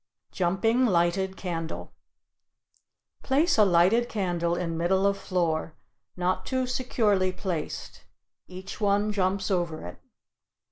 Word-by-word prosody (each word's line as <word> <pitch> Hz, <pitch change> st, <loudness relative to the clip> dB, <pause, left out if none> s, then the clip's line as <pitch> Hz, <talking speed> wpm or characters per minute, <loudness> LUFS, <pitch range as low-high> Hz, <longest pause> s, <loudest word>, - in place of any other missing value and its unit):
JUMPING 210 Hz, +8 st, +2 dB
LIGHTED 190 Hz, +1 st, +1 dB
CANDLE 165 Hz, -3 st, -5 dB, 1.3 s
Place 295 Hz, +6 st, +2 dB
a -, -, +8 dB
lighted 195 Hz, +6 st, +4 dB
candle 175 Hz, -4 st, -1 dB
in 170 Hz, -2 st, -3 dB
middle 185 Hz, +4 st, +1 dB
of 200 Hz, 0 st, +3 dB
floor, 170 Hz, -5 st, -1 dB, 0.4 s
not 180 Hz, +1 st, 0 dB
too 260 Hz, -1 st, -1 dB
securely 220 Hz, -7 st, +1 dB
placed; 180 Hz, -5 st, -5 dB, 0.4 s
each 185 Hz, +4 st, -9 dB
one 205 Hz, +1 st, +2 dB
jumps 195 Hz, 0 st, 0 dB
over 170 Hz, -, -1 dB
it. 90 Hz, 0 st, -9 dB
185 Hz, 110 wpm, -27 LUFS, 175-205 Hz, 1.3 s, a